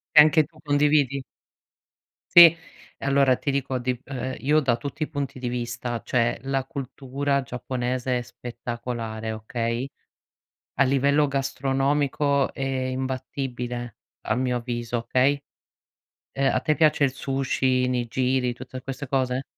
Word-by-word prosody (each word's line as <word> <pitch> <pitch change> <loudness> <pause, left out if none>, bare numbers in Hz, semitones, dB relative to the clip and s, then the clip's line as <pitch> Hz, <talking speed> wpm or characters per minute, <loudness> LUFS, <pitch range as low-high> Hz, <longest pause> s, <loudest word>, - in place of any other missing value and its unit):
E - - +11
anche 155 +1 +5
tu 160 -1 -23
condividi? 145 -2 +2 1.1
Sì. 170 -1 +11 0.5
E - - -6
allora 140 -2 +4
ti 140 - -1
dico 135 -1 -1
di 125 0 -1
ehm, 130 -1 -4
io 150 +6 +3
da 130 -5 +2
tutti 140 +6 -4
i - - -2
punti 140 -4 -4
di 125 - -3
vista, 120 -1 -3
cioè 115 -1 +1
la 135 -1 -1
cultura 140 -1 -2
giapponese 125 0 -2
è - - -4
spettacolare, 120 -2 -5
okay. 115 +3 -3 0.9
A - - +7
livello 140 +2 +3
gastronomico 140 +1 0
è - - -7
imbattibile 130 -2 -3 0.3
a 110 - -1
mio 125 -1 0
avviso, 120 0 -3
okay. 130 +4 +1 0.9
Ehm, 135 0 +1
a - - +3
te 155 - +1
piace 155 -2 +3
il 135 - +3
sushi, 135 -2 0
i - - +2
nigiri, 125 +1 0
tutte 130 +1 -9
queste 135 +2 -6
cose? 130 0 0
130 Hz, 140 wpm, -25 LUFS, 125-140 Hz, 1.1 s, E